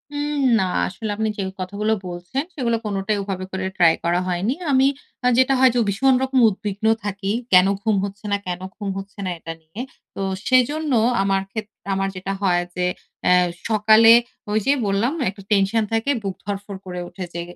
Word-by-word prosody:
উম 290 0 -2 0.2
না। - - +2 0.2
আসলে 215 +4 -6
আপনি 220 +1 -1
যে - - -2 0.2
কথাগুলো 205 +4 -1
বলছেন 180 +10 -4
সেগুলো 235 -6 0
কোনটাই 205 0 -1
ওভাবে 190 -1 -4
করে 190 0 -3
ট্রাই 165 -2 +6
করা 175 +1 +2
হয়নি। 185 +6 0 0.2
আমি 265 0 +5 0.4
আ - - +5
যেটা 260 +1 +4
হয় 260 0 +7
যে - - -1
উ - - +3
ভীষণ 265 +7 +3
রকম 265 0 +1
উদ্বিগ্ন 205 +1 -5 0.2
থাকি। 200 -1 -3 0.2
কেন 180 +1 +7
ঘুম 215 0 +1
হচ্ছে 200 +2 -9
না? 200 - +3
কেন 180 0 -3
ঘুম 205 -2 -5
হচ্ছে 195 +1 -9
না? - - -1
এটা 165 0 -6
নিয়ে। 160 +8 -8 0.3
তো - - -4 0.3
সেজন্য 290 +4 +2 0.3
আমার 195 0 +1
ক্ষেত 220 0 -4 0.3
আমার 195 0 0
যেটা 190 +1 -4
হয় 180 -3 +2
যে 180 0 0 0.5
এহ 180 0 +5 0.2
সকালে 220 +1 +7 0.4
ওই 215 - +2
যে 275 - +4
বললাম 200 +5 +1
না - - 0
একটা 200 0 -14
টেনশন 205 +2 +3
থাকে 225 +5 +1
বুক 195 -2 -3
ধড়ফড় 200 -1 -5
করে 180 -1 -5
উঠে 190 - -7
যে 170 - -3
200 Hz, 190 wpm, -22 LUFS, 190-225 Hz, 0.5 s, হয়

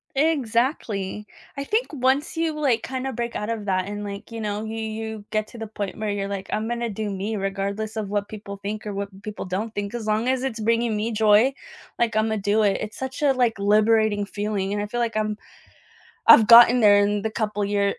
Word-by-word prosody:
Exactly, 235 -8 0 0.3
I 280 - -2
think 435 - 0
once 270 +4 +1
you 320 -2 -1
like 255 -6 +2
kinda 265 0 -4
break 235 0 -4
out 210 - -3
of 225 -3 -3
that 185 -2 0
and 205 0 -5
like, 200 +2 -7
you 230 -1 -5
know, 210 0 -3
you 220 +1 -5
you 220 -1 -5
get 215 0 -1
to - - -12
the 225 - -5
point 205 -2 -5
where 215 -1 -3
you're 200 -1 -2
like, 200 -1 -5
I'm 215 +1 -1
gonna 235 0 -2
do 215 0 -4
me 200 +3 -3
regardless 200 +2 -3
of 210 -2 -3
what 205 0 -1
people 200 -2 -8
think 210 +2 -5
or 205 - -3
what 195 -1 -6
people 210 +1 -6
don't 200 +4 -3
think, 205 +1 -3
as 230 -3 -5
long 215 +3 +1
as 260 0 +1
it's 250 -4 -3
bringing 230 +1 +1
me 220 +2 -1
joy, 220 +4 +4 0.5
like 230 -2 +1
Imma 220 0 +1
do 205 +2 +1
it. 200 -2 +2
It's 215 0 -6
such 265 +1 -5
a 280 -2 +4
like 240 -4 +1
liberating 210 0 +3
feeling 205 -1 -3
and 205 - -1
I 205 - -3
feel 240 +3 -4
like 230 -2 -1
I'm 215 -1 -1 0.9
I've 220 - +8
gotten 240 +2 +9
there 205 -3 +6
in 205 0 +1
the 220 - -1
couple 210 -2 -2
year 200 0 +1
215 Hz, 225 wpm, -24 LUFS, 205-235 Hz, 0.9 s, gotten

